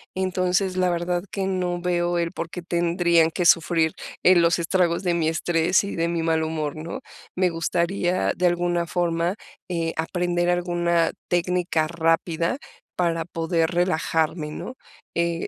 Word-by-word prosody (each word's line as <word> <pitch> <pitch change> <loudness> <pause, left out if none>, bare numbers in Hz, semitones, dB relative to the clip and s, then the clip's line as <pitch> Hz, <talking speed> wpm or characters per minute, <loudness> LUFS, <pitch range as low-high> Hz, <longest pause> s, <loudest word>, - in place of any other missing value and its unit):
entonces, 185 0 0
la 185 -1 +2
verdad 175 +1 -1
que 195 -1 -2
no 180 -2 -1
veo 175 -1 0
el 170 -1 -1
por 165 -2 -5
qué 180 - -6
tendrían 170 -1 +2
que 175 +1 -2
sufrir, 160 -1 +4 0.3
eh, 185 +1 +7
los 170 0 +4
estragos 170 +1 +1
de 175 -1 +1
mi 165 -2 +1
estrés 165 +3 +2
y 200 - -5
de 165 0 +1
mi 170 -1 -1
mal 160 -1 +1
humor, 155 -2 -3
¿no?, 170 +12 -6 0.3
me 185 -1 +2
gustaría, 175 +2 0
de 180 0 +2
alguna 175 -1 0
forma, 170 +2 0 0.3
eh, 165 -2 -2
aprender 175 +1 0
alguna 175 -1 +1 0.2
técnica 175 -2 0
rápida 165 - 0 0.4
para 165 -2 0
poder 165 -1 0
relajarme, 160 -3 0
¿no?, 250 - -7 0.4
eh, 170 0 -1
170 Hz, 150 wpm, -24 LUFS, 165-180 Hz, 0.4 s, eh